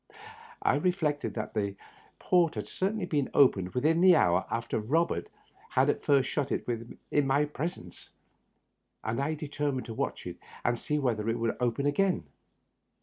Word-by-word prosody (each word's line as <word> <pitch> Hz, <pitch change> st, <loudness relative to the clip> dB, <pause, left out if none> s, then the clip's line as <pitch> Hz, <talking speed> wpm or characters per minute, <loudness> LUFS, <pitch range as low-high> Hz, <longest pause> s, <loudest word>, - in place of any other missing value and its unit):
I -, -, +3 dB
reflected 165 Hz, -6 st, 0 dB
that 110 Hz, -1 st, -4 dB
the 100 Hz, -3 st, -1 dB, 0.4 s
port 175 Hz, -3 st, +2 dB
had -, -, -4 dB
certainly 195 Hz, +1 st, -1 dB
been 145 Hz, -6 st, 0 dB
opened 95 Hz, -9 st, +4 dB
within 160 Hz, +7 st, +3 dB
an 185 Hz, -2 st, +8 dB
hour 90 Hz, -, +3 dB
after 115 Hz, -1 st, -2 dB
Eobert 135 Hz, -, 0 dB, 0.4 s
had -, -, +3 dB
at -, -, -7 dB
first 135 Hz, -2 st, +3 dB
shut 140 Hz, -3 st, -2 dB
it -, -, -1 dB, 0.5 s
in 145 Hz, -2 st, +2 dB
my 140 Hz, +2 st, +3 dB
presence, 150 Hz, -, -6 dB, 0.9 s
and 115 Hz, +4 st, -1 dB
I 155 Hz, +3 st, -1 dB
determined 145 Hz, -3 st, -3 dB
to 115 Hz, -, -6 dB
watch -, -, -3 dB
it -, -, -7 dB, 0.3 s
and 120 Hz, -1 st, +1 dB
see 150 Hz, -, -1 dB
whether 115 Hz, -6 st, 0 dB
it 115 Hz, -, 0 dB
would 115 Hz, -1 st, -1 dB
open 125 Hz, +2 st, 0 dB
again. 185 Hz, +6 st, +1 dB
140 Hz, 160 wpm, -29 LUFS, 115-155 Hz, 0.9 s, an